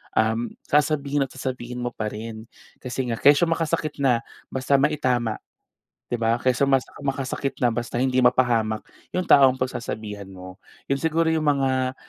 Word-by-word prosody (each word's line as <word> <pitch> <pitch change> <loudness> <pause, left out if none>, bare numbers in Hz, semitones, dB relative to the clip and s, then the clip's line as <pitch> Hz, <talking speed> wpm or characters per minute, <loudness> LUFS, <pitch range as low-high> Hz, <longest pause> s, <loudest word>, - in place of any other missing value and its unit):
Um, 110 +1 0
sasabihin 145 -1 +1
at - - -23
sasabihin 125 -2 -5
mo 120 - -2
pa 110 -2 -4
rin, 110 +1 -7 0.3
kasi 125 +1 -3
nga, 115 - -3
kesyo 145 +4 +5
makasakit 165 -2 -1
na, 125 -4 +2 0.2
basta 135 +1 +1
maitama, 130 -6 +1 0.8
'di 120 - -1
ba? 115 0 +2
Kaysa 130 +2 +2
masa 135 -1 +1
makasakit 135 -1 -3
na 120 - +4
basta 120 +1 -2
hindi 130 -1 +1
mapahamak, 120 -3 +2 0.3
yung 185 - +1
taong 135 -6 +6
pagsasabihan 110 -5 -4
mo. 95 -1 -11 0.3
Yun 140 - +2
siguro 160 +2 +1
yung 160 -1 0
mga 130 -2 +1
130 Hz, 155 wpm, -24 LUFS, 115-140 Hz, 0.8 s, taong